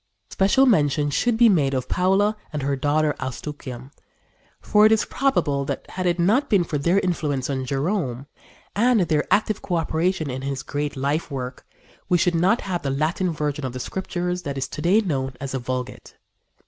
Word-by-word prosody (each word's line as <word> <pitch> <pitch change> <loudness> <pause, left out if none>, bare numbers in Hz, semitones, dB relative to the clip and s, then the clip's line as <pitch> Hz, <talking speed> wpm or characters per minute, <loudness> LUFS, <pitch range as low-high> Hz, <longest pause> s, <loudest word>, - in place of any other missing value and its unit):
Special 200 +8 +3
mention 145 - +2
should 240 +8 +1
be 235 0 +6
made 145 -10 +2
of 130 -1 -2
Paula 195 +4 +2 0.2
and 150 -3 -3
her 140 0 0
daughter 150 +2 +1
Eustochium; 130 -1 -6 0.7
for 210 0 +3
it - - +1
is 220 - +3
probable 150 - 0
that, - - -4
had 185 0 -2
it 175 0 +1
not 220 +12 +2
been 195 -4 +4
for 150 -3 -3
their 170 +7 +2
influence 145 -7 -1
on 130 -1 -2
Jerome, 135 - -1 0.5
and 235 +1 +3
their 155 -4 0
active 215 0 +2
coöperation 165 0 -1
in 130 -1 -4
his 135 -1 -4
great 145 +2 -3
life 145 +5 -1
work, 130 -2 -6 0.4
we 180 - +4
should 175 +1 +2
not 185 +8 +2
have 180 -3 -3
the 140 - -2
Latin 155 +7 0
version 150 -2 -2
of 130 -2 -3
the 130 - -5
Scriptures 180 +3 -3
that 140 -5 -5
is 130 -1 -2
to 150 - -6
day 190 +7 +4
known 135 - -2
as 135 0 -5
the 135 - -2
Vulgate. 125 0 -5
155 Hz, 185 wpm, -23 LUFS, 135-185 Hz, 0.7 s, be